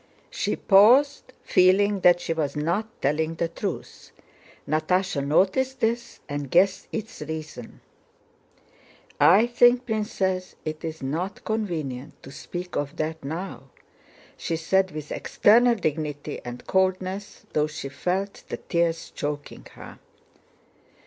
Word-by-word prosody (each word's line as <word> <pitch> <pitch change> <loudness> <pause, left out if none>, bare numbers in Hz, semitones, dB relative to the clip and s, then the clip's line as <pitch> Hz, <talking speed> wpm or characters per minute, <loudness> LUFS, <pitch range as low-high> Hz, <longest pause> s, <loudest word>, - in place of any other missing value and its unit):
She - - -1
paused, 255 +8 +5
feeling 195 +2 +4
that 175 -1 +5
she 165 - -2
was 150 -3 -2
not 170 +9 -1 0.2
telling 155 +3 0
the 165 0 -1
truth. 185 +2 -6 0.6
Natásha 155 0 0
noticed 195 - +1
this 235 +1 -2
and 145 -1 -4
guessed 185 +4 +3
its 220 -4 -6
reason. 150 -5 -7 1.4
"I 200 +7 +6
think, 245 +1 +4
Princess, 195 -5 -2
it 155 0 -5
is 160 -3 -5
not 170 +9 -3
convenient 160 - -4
to 135 - -10
speak 180 +5 -7
of 145 -1 -2
that 160 0 -3
now," 165 +7 -6 0.7
she 165 - -2
said 190 +4 +1
with 155 -3 -8
external 235 +3 +4
dignity 150 -6 -3
and 120 0 -8
coldness, 190 +1 -1
though 150 0 +2
she 150 -2 -6
felt 185 +8 -3
the - - -3
tears 170 -2 -1
choking 145 0 -5
her. - - -12
175 Hz, 120 wpm, -25 LUFS, 155-200 Hz, 1.4 s, I